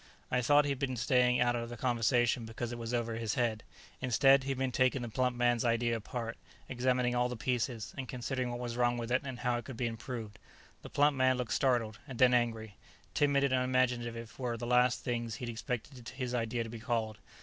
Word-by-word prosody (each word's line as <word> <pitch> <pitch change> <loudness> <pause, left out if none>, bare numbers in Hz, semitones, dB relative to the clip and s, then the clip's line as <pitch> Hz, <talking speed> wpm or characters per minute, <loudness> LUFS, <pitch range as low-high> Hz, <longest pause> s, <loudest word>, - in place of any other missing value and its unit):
I 125 - +2
thought 145 +4 +5
he'd 140 -2 -1
been 130 -3 -2
staying 125 +1 +3
out 120 0 +3
of 115 0 -3
the 120 - -7
conversation 120 0 +2
because 115 +1 -5
it 120 - -5
was 115 0 -4
over 115 -2 -1
his 115 -2 -2
head. 115 -3 0 0.4
Instead, 135 +2 +4
he - - -3
had 135 - -1
been 130 -1 0
taking 130 +1 +2
the 120 - -4
plump 125 +2 0
man's 120 -1 +2
idea 115 0 +1
apart, 115 +1 -5 0.3
examining 125 0 +1
all 125 0 +1
the 125 - -4
pieces, 115 -2 -2
and 130 -2 -6
considering 125 0 -2
what 120 - -3
was 120 -1 -4
wrong 120 0 +2
with 120 0 -4
it 125 - +3
and 130 -3 -5
how 125 -1 +1
it 120 - -10
could 130 -4 -8
be 125 - -1
improved. 115 -2 -5 0.4
The - - -10
plump 145 0 +3
man 130 -1 +3
looked 120 -2 -2
startled, 120 -5 +1
and 130 -4 -7
then 125 0 +5
angry 115 -3 0 0.4
timid 140 -1 +3
and 140 -2 +2
unimaginative 125 -3 0
were 120 -2 -2
the 120 - -5
last 125 0 +3
things 120 -2 -2
he'd 120 +1 -5
expected 120 +1 -5
his 125 -2 -4
idea 115 0 -1
to 115 - -8
be 115 - -7
called. 110 -1 -2
120 Hz, 220 wpm, -32 LUFS, 115-130 Hz, 0.4 s, thought